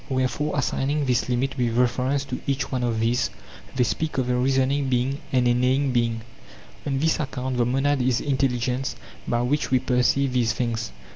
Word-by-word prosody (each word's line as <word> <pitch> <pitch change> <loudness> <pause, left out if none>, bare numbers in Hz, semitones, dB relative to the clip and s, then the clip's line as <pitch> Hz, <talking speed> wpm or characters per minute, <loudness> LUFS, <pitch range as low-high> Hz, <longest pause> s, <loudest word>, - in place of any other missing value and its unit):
Wherefore, 130 +3 -1
assigning 140 +2 0
this 125 -1 +1
limit 130 +2 -1
with 120 -1 0
reference 130 +3 +1
to 125 -2 -5
each 140 0 -1
one 130 -2 -1
of 115 -2 0
these, 115 +2 +1 0.5
they 125 - +3
speak 155 +6 -2
of 125 -1 0
a - - +2
reasoning 135 +2 +1
being 130 +3 0
and 125 -2 +3
a 120 - +4
neighing 130 +3 +2
being. 115 -2 0 0.7
On 135 -1 0
this 160 +5 +1
account 130 -3 -3
then 120 -1 +2
the - - 0
monad 145 -1 +2
is 125 -1 +2
intelligence 130 -2 -1 0.3
by 120 0 +1
which 145 +4 0
we 130 - +4
perceive 125 +2 +1
these 120 -2 +2
things. 120 -2 -2
130 Hz, 190 wpm, -24 LUFS, 125-135 Hz, 0.7 s, a